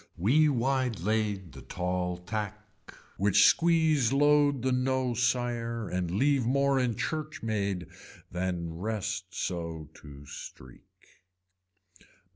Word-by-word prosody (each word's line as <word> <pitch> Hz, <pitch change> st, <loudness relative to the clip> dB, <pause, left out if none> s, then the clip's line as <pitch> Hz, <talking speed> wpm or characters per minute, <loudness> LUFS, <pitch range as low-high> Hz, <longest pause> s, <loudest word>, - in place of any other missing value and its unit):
We 145 Hz, -, +4 dB
wide 130 Hz, -3 st, 0 dB
lade 105 Hz, -2 st, -1 dB
the -, -, -11 dB
tall 90 Hz, 0 st, -2 dB
tack 105 Hz, +3 st, -4 dB, 0.6 s
which 100 Hz, 0 st, +5 dB
squeeze 160 Hz, -7 st, +4 dB
load 145 Hz, -1 st, +3 dB
the 130 Hz, -, +1 dB
no 130 Hz, 0 st, +1 dB
sire 120 Hz, -1 st, -1 dB
and 90 Hz, -1 st, -2 dB
leave 135 Hz, +8 st, +2 dB
more 140 Hz, +2 st, +2 dB
in 125 Hz, -3 st, 0 dB
church 155 Hz, +3 st, -4 dB
maid 100 Hz, -5 st, -1 dB, 0.5 s
than 90 Hz, -2 st, -3 dB
rest 110 Hz, 0 st, -3 dB
so 85 Hz, -4 st, -4 dB
to 70 Hz, 0 st, -12 dB
streak. 65 Hz, -2 st, -13 dB
110 Hz, 110 wpm, -29 LUFS, 90-130 Hz, 0.6 s, which